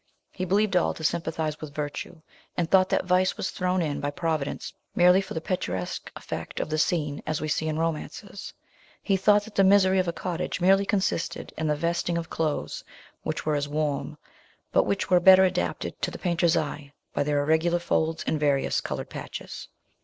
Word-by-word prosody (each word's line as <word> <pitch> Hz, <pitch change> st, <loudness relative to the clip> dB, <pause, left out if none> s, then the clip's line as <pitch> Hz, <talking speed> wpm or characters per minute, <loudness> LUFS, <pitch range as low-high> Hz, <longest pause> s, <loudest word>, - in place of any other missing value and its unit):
He 185 Hz, -, -4 dB
believed 200 Hz, +2 st, +2 dB
all 180 Hz, -, +2 dB
to 160 Hz, -, -9 dB
sympathise 160 Hz, -1 st, -1 dB
with 145 Hz, -2 st, -8 dB
virtue, 150 Hz, +2 st, -5 dB, 0.3 s
and 170 Hz, -, +1 dB
thought 185 Hz, +1 st, +4 dB
that -, -, +1 dB
vice 180 Hz, +1 st, +2 dB
was -, -, -2 dB
thrown 180 Hz, -1 st, 0 dB
in 145 Hz, -3 st, -2 dB
by 145 Hz, -, -1 dB
Providence 155 Hz, -2 st, -3 dB, 0.2 s
merely 180 Hz, +2 st, +6 dB
for 195 Hz, -, -8 dB
the 160 Hz, -, -2 dB
picturesque 95 Hz, -, -3 dB
effect -, -, -6 dB
of -, -, -3 dB
the 155 Hz, -, 0 dB
scene, 150 Hz, -5 st, 0 dB
as 155 Hz, -1 st, -1 dB
we 155 Hz, -, -3 dB
see 155 Hz, +1 st, 0 dB
in 155 Hz, 0 st, -1 dB
romances: 165 Hz, +5 st, -4 dB, 0.5 s
he 195 Hz, -, +2 dB
thought 205 Hz, +2 st, +4 dB
that 220 Hz, 0 st, -12 dB
the 195 Hz, -, +4 dB
misery 190 Hz, -1 st, +5 dB
of 185 Hz, -, +1 dB
a -, -, +1 dB
cottage 180 Hz, +1 st, -3 dB
merely 195 Hz, +2 st, +4 dB
consisted 190 Hz, -4 st, -1 dB
in 160 Hz, -, -2 dB
the 150 Hz, -, +2 dB
vesting 170 Hz, +2 st, -1 dB
of 165 Hz, -1 st, -5 dB
clothes, 155 Hz, -2 st, -2 dB, 0.4 s
which -, -, -4 dB
were 155 Hz, -, +1 dB
as 145 Hz, 0 st, 0 dB
warm, 150 Hz, -1 st, -2 dB, 0.5 s
but -, -, +3 dB
which 200 Hz, -1 st, -1 dB
were 180 Hz, -, +7 dB
better 190 Hz, +1 st, +8 dB
adapted 185 Hz, -, -1 dB
to -, -, 0 dB
the -, -, -8 dB
painter's 170 Hz, -1 st, +2 dB
eye 145 Hz, -2 st, -4 dB, 0.2 s
by -, -, 0 dB
their 145 Hz, 0 st, +1 dB
irregular 160 Hz, +4 st, +2 dB
folds 160 Hz, -2 st, 0 dB
and 155 Hz, -, 0 dB
various 140 Hz, -2 st, +1 dB
coloured -, -, -5 dB
patches. -, -, -7 dB
165 Hz, 195 wpm, -26 LUFS, 155-185 Hz, 0.5 s, better